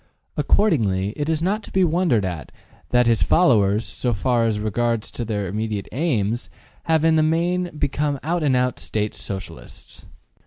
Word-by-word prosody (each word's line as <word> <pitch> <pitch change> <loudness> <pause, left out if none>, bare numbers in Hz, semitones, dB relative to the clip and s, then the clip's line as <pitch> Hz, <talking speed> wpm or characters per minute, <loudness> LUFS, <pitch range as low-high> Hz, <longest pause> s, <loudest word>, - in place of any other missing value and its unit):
Accordingly, 105 - +2
it 145 +1 -2
is 160 0 0
not 205 +4 0
to - - -13
be 190 - +3
wondered 165 - +2
at 85 -7 -5 0.4
that 125 0 +3
his 115 -2 +2
followers, 110 - +3
so 120 -2 -2
far 120 +1 +1
as 105 -2 -1
regards 115 +1 -1
their 110 -4 -3
immediate 105 +1 -3
aims, 120 -7 -1 0.4
have 160 -1 +2
in 160 -1 +4
the - - +4
main 175 +3 +1
become 145 0 -1
out 170 +3 -1
and 140 -4 +2
out 125 0 0
State 105 -1 -2
Socialists. 95 -1 -8
125 Hz, 160 wpm, -22 LUFS, 105-160 Hz, 0.4 s, in